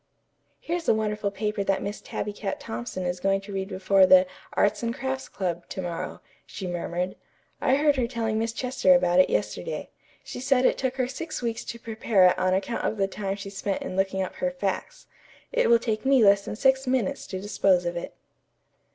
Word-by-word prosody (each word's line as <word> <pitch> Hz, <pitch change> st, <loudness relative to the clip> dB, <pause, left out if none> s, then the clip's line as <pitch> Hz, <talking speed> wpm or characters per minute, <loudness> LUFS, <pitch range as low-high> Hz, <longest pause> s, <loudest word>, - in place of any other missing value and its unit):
"Here's 350 Hz, -8 st, -3 dB
the -, -, +5 dB
wonderful 210 Hz, -1 st, -1 dB
paper 205 Hz, +1 st, -2 dB
that 195 Hz, -1 st, 0 dB
Miss 205 Hz, +1 st, -5 dB
Tabby 210 Hz, -, -4 dB
Cat 200 Hz, -1 st, -4 dB
Thompson 120 Hz, +11 st, -5 dB
is 180 Hz, 0 st, -2 dB
going 195 Hz, +1 st, +2 dB
to 200 Hz, 0 st, -9 dB
read 190 Hz, 0 st, -3 dB
before 190 Hz, 0 st, +4 dB
the 185 Hz, 0 st, +7 dB, 0.3 s
'Arts 205 Hz, -, +2 dB
and 235 Hz, 0 st, -2 dB
Crafts 265 Hz, 0 st, -3 dB
Club' 175 Hz, -3 st, -3 dB
to -, -, -6 dB
morrow," 170 Hz, -1 st, -5 dB, 0.3 s
she 190 Hz, -, -7 dB
murmured. 175 Hz, +1 st, -3 dB, 0.5 s
"I 260 Hz, -, +3 dB
heard 290 Hz, 0 st, +3 dB
her 245 Hz, -2 st, +1 dB
telling 225 Hz, -3 st, -1 dB
Miss 225 Hz, 0 st, -1 dB
Chester 230 Hz, -6 st, +3 dB
about 175 Hz, 0 st, +3 dB
it 185 Hz, -, +5 dB
yesterday. 485 Hz, -, -2 dB, 0.3 s
She -, -, -7 dB
said 260 Hz, 0 st, +2 dB
it -, -, +3 dB
took 260 Hz, -1 st, -1 dB
her 255 Hz, -2 st, 0 dB
six 315 Hz, +2 st, -5 dB
weeks 230 Hz, -1 st, -2 dB
to 235 Hz, -, -6 dB
prepare 220 Hz, -4 st, +2 dB
it -, -, -1 dB
on 185 Hz, 0 st, +2 dB
account 195 Hz, +5 st, -2 dB
of 220 Hz, -, -1 dB
the 195 Hz, -1 st, +2 dB
time 195 Hz, 0 st, -3 dB
she 195 Hz, 0 st, -8 dB
spent 195 Hz, 0 st, -3 dB
in -, -, -5 dB
looking 190 Hz, 0 st, 0 dB
up 185 Hz, -, -5 dB
her 270 Hz, -, 0 dB
facts. 235 Hz, -8 st, -4 dB, 0.5 s
It -, -, +2 dB
will 235 Hz, -, +7 dB
take 220 Hz, -2 st, -2 dB
me 265 Hz, -3 st, +5 dB
less 200 Hz, 0 st, +5 dB
than -, -, -4 dB
six 265 Hz, +3 st, +2 dB
minutes 255 Hz, -6 st, 0 dB
to 185 Hz, -, -4 dB
dispose 190 Hz, -2 st, +2 dB
of 175 Hz, 0 st, -2 dB
it." 170 Hz, -, -6 dB
205 Hz, 210 wpm, -26 LUFS, 190-250 Hz, 0.5 s, the